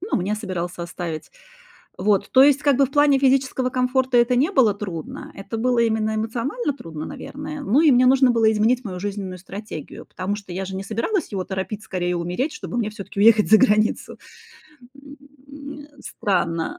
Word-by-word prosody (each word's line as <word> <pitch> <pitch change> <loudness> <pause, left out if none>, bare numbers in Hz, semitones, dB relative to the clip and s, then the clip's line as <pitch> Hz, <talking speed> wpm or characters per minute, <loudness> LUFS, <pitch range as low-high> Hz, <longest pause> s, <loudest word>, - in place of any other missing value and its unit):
ну 395 +5 -2
мне 195 +3 -1
собирался 180 -5 -5
оставить. 170 -2 -6 0.7
Вот, 200 +1 +1
то 260 - +6
есть 285 0 +4
как 280 -3 +3
бы 275 - +4
в - - -16
плане 290 -1 +4
физического 265 -1 +2
комфорта 255 0 0
это 240 +1 +4
не 275 +8 +2
было 255 - +4
трудно, 185 -6 -7
это 195 +3 -6
было 245 +1 +1
именно 220 -2 +1
эмоционально 240 - -2
трудно, 160 - -8
наверное. 300 - -7
Ну 280 +2 +2
и 315 - +6
мне 255 -1 +5
нужно 260 0 +5
было 225 -2 +3
изменить 225 +4 +2
мою 190 -6 -6
жизненную 195 -1 -5
стратегию, 190 -3 -9
потому 190 +2 -4
что 200 -3 -9
я 190 +2 -3
же 190 0 -7
не 190 - -5
собиралась 230 - -2
его 190 -2 -2
торопить 190 +3 -5
скорее 180 -1 -2
умереть, 180 - -2
чтобы 240 - -5
мне 225 -3 0
всё-таки 205 -2 -7
уехать 220 -1 +5
за 220 - +8
границу, 215 -3 +1 0.8
м, 280 0 -14 0.6
э, 290 -1 -16
странно. 170 -4 -2
220 Hz, 180 wpm, -22 LUFS, 190-260 Hz, 0.8 s, за